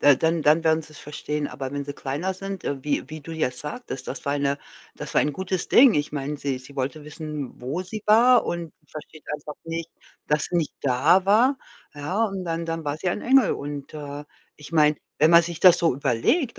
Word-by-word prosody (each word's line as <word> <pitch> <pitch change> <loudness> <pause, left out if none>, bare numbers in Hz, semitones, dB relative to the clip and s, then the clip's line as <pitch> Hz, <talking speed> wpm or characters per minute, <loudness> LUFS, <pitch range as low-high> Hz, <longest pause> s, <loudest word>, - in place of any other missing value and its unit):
Da 145 -2 +6
dann 160 -1 +1
dann 155 +3 +4
werden 160 0 +3
sie's 155 -1 -13
verstehen. 150 0 -4
Aber 135 -2 -6
wenn 145 0 -3
sie 145 - -5
kleiner 150 +8 -3
sind, 195 0 -6
äh, 135 -2 -3
wie 145 -1 -1
wie 155 0 -7
du 165 - -10
jetzt 130 -6 -1
sagtest, 150 - -6
das 135 - -6
war 140 - 0
eine 140 0 0 0.4
das - - -7
war - - +5
ein 150 - 0
gutes 185 +3 -2
Ding. 255 -2 +7
Ich 145 0 0
meine, 145 0 -3
sie 135 -3 -2
sie 130 +2 -14
wollte 140 +3 -3
wissen, 150 -4 -6
wo 140 +9 -3
sie 210 +3 -7
war, 240 +4 +6
und 170 -2 -4 0.2
versteht 155 0 -11
einfach 150 0 -6
nicht, 165 0 -5 0.4
dass 150 0 +1
sie 175 - -2
nicht 160 -4 -1
da 140 +8 +3
war, 240 +7 +4 0.4
ja. 180 +10 -1
Und 195 -3 -3
dann 165 0 -3
dann 165 -1 -3
war 145 0 -2
sie 180 +3 -2
ein - - -2
Engel. 260 -3 +4
Und, 145 +1 -6
äh, 145 -1 -7 0.3
ich 150 +2 -12
meine, 150 -2 +4 0.2
wenn 155 +3 +5
man 170 0 +8
sich 170 -1 -5
das 180 -2 +8
so 165 -6 +2
überlegt, 140 - 0
155 Hz, 220 wpm, -24 LUFS, 145-175 Hz, 0.4 s, man